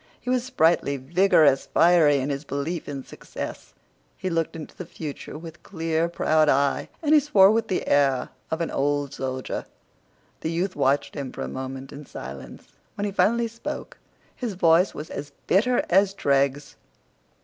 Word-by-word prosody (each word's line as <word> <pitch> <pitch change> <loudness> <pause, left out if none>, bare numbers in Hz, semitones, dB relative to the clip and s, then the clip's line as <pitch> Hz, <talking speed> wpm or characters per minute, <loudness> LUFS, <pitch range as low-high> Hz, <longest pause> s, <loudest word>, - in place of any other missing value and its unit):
He 250 - -3
was 250 -1 +1
sprightly, 165 - +2
vigorous, 155 -1 +3
fiery 165 -4 +5
in 135 +2 -1
his 140 +1 -3
belief 145 +4 -4
in 140 -2 -5
success. - - -8 0.4
He 185 - -3
looked 165 -1 -1
into 160 -2 -9
the 180 - -8
future 150 -2 -7
with 165 0 -10
clear 165 -2 -1
proud 155 -2 +2
eye, 140 0 +1
and 300 0 +3
he 305 - +8
swore 210 -9 +5
with 225 0 +1
the 185 - -1
air 135 -3 +2 0.2
of 160 +1 -2
an 165 - -2
old 145 0 0
soldier. 130 -2 -4 0.7
The 160 - -3
youth 175 +3 -1
watched 140 0 +1
him 140 -3 -5
for - - -6
a - - -4
moment 130 0 -6
in 145 0 -10
silence. 65 0 -9 0.3
When 205 - -2
he 205 - -2
finally 225 +5 +2
spoke 230 +1 -7 0.4
his 235 -6 -4
voice 175 +1 +4
was 150 - -7
as 145 0 -6
bitter 240 +6 +2
as 195 +2 +3
dregs. 140 -2 0
160 Hz, 170 wpm, -25 LUFS, 140-190 Hz, 0.7 s, he